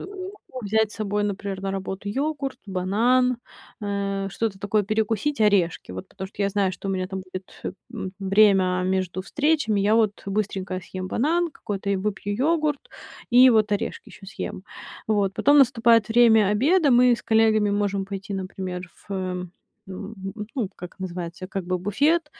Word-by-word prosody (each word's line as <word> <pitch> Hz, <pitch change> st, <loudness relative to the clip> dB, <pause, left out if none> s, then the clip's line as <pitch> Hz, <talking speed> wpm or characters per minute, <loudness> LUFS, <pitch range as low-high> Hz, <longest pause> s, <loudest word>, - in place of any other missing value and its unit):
Могу 380 Hz, -, -8 dB
взять 220 Hz, +1 st, +2 dB
с -, -, -10 dB
собой, 205 Hz, -1 st, -1 dB
например, 200 Hz, -1 st, -4 dB
на 195 Hz, -, -2 dB
работу 195 Hz, +1 st, -4 dB
йогурт, 280 Hz, +2 st, -2 dB
банан, 230 Hz, +7 st, +2 dB, 0.4 s
э, 200 Hz, -1 st, -2 dB
что-то 210 Hz, -2 st, -2 dB
такое 205 Hz, +1 st, +1 dB
перекусить, 220 Hz, +5 st, -1 dB
орешки. 200 Hz, -5 st, +2 dB
Вот, 185 Hz, -, -7 dB
потому 190 Hz, -1 st, -7 dB
что 205 Hz, -, -4 dB
я 200 Hz, -, +2 dB
знаю, 200 Hz, -1 st, +1 dB
что 185 Hz, +2 st, -6 dB
у -, -, +1 dB
меня 185 Hz, -1 st, -1 dB
там 190 Hz, -1 st, -4 dB
будет, 185 Hz, 0 st, -9 dB
э, -, -, -2 dB, 0.2 s
м, 190 Hz, -5 st, -5 dB
время 195 Hz, -2 st, +4 dB
между 185 Hz, -1 st, -1 dB
встречами. 290 Hz, -4 st, +1 dB
Я 210 Hz, +2 st, +3 dB
вот 215 Hz, -3 st, +1 dB
быстренько 195 Hz, -2 st, -2 dB
съем 185 Hz, +1 st, -6 dB
банан 335 Hz, -, +1 dB
какой-то 200 Hz, -8 st, -5 dB
и 195 Hz, -, +2 dB
выпью 205 Hz, +1 st, -2 dB
йогурт, 300 Hz, +2 st, +1 dB, 0.5 s
и 250 Hz, +2 st, +8 dB
вот 215 Hz, -2 st, +3 dB
орешки 205 Hz, -, -3 dB
ещё 195 Hz, -, -13 dB
съем. 190 Hz, -1 st, -6 dB, 0.4 s
Вот, 205 Hz, -3 st, +1 dB
потом 290 Hz, +1 st, +4 dB
наступает 230 Hz, -4 st, +5 dB
время 225 Hz, -3 st, +6 dB
обеда. 285 Hz, -, +3 dB
Мы 245 Hz, 0 st, +6 dB
с -, -, -12 dB
коллегами 220 Hz, -2 st, +3 dB
можем 200 Hz, -1 st, 0 dB
пойти, 195 Hz, +1 st, -5 dB
например, 185 Hz, -1 st, -5 dB, 0.2 s
в, -, -, -5 dB
э, 185 Hz, -1 st, -3 dB, 0.4 s
м, 200 Hz, +3 st, -7 dB, 0.4 s
ну, 230 Hz, -8 st, -1 dB
как 180 Hz, +1 st, -10 dB
называется, 180 Hz, -1 st, -6 dB
как 195 Hz, -1 st, -4 dB
бы 180 Hz, +1 st, -1 dB
буфет. 285 Hz, -, +2 dB
205 Hz, 170 wpm, -24 LUFS, 190-230 Hz, 0.5 s, и